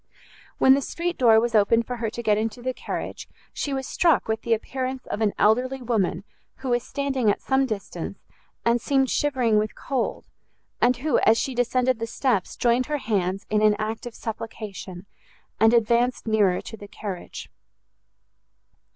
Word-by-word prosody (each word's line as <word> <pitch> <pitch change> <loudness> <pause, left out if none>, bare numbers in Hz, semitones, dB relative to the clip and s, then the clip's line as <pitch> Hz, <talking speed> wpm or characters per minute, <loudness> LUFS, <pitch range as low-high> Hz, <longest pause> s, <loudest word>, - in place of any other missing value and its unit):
When 265 - +6
the 275 - +2
street 345 +5 -3
door 225 -3 +5
was 235 +1 -1
opened 225 +2 +4
for 245 +1 -4
her 225 -1 -2
to 235 +2 -6
get 210 -2 +3
into 225 +3 -3
the 255 0 -1
carriage, - - -6 0.2
she 285 - -3
was 265 -1 -2
struck 330 -2 +2
with 220 0 -1
the 230 -1 +2
appearance 260 +3 -4
of 210 - -4
an 215 -2 +3
elderly 250 +6 +2
woman 225 -7 -1 0.3
who 265 - -6
was 240 0 +2
standing 270 -4 -1
at 205 - +1
some 265 0 +1
distance, 210 -4 -5 0.5
and 235 0 +3
seemed 270 0 +1
shivering 250 -7 +2
with 215 0 -2
cold, 260 -3 -3 0.6
and 245 +1 +4
who, 280 +1 +1
as 220 +1 +4
she 265 - -1
descended 250 0 +1
the 230 - -3
steps, 235 -5 -1
joined 240 +1 +2
her 300 0 -1
hands 195 -6 -1
in 215 0 +2
an 215 -1 +5
act 220 +2 -4
of 240 - -9
supplication, 210 -4 -7 0.5
and 225 +1 +6
advanced 235 +2 +2
nearer 210 -5 +2
to - - -9
the 205 -1 -11
carriage. 200 -3 -7
235 Hz, 175 wpm, -24 LUFS, 215-255 Hz, 0.6 s, When